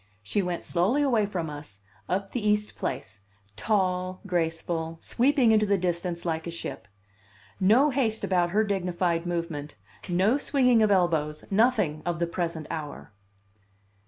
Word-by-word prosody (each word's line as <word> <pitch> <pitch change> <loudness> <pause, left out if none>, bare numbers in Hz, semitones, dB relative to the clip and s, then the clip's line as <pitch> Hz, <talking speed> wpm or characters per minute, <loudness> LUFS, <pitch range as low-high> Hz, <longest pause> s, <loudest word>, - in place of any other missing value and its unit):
She 200 - 0
went 180 -2 -3
slowly 200 +12 +1
away 230 -7 +2
from 180 -5 -3
us, 145 -10 -9 0.3
up 195 +2 -1
the 245 - -3
East 210 0 +1
Place, 100 +1 -5 0.3
tall, 185 - 0
graceful, 165 -2 -2
sweeping 255 - +3
into 215 -1 +3
the 200 0 +3
distance 175 -1 -2
like 160 -1 -2
a - - -2
ship. 170 - -6 0.7
No 235 +10 +5
haste 235 -5 0
about 175 -2 +2
her 210 +5 +2
dignified 180 -4 -1
movement, 165 -4 -4 0.3
no 195 +10 +2
swinging 250 -5 +3
of 215 - +4
elbows, 160 -6 +1
nothing 200 -8 +2
of 175 -1 -2
the 170 - 0
present 170 -2 -3
hour! 150 -8 -6
180 Hz, 145 wpm, -27 LUFS, 165-210 Hz, 0.7 s, No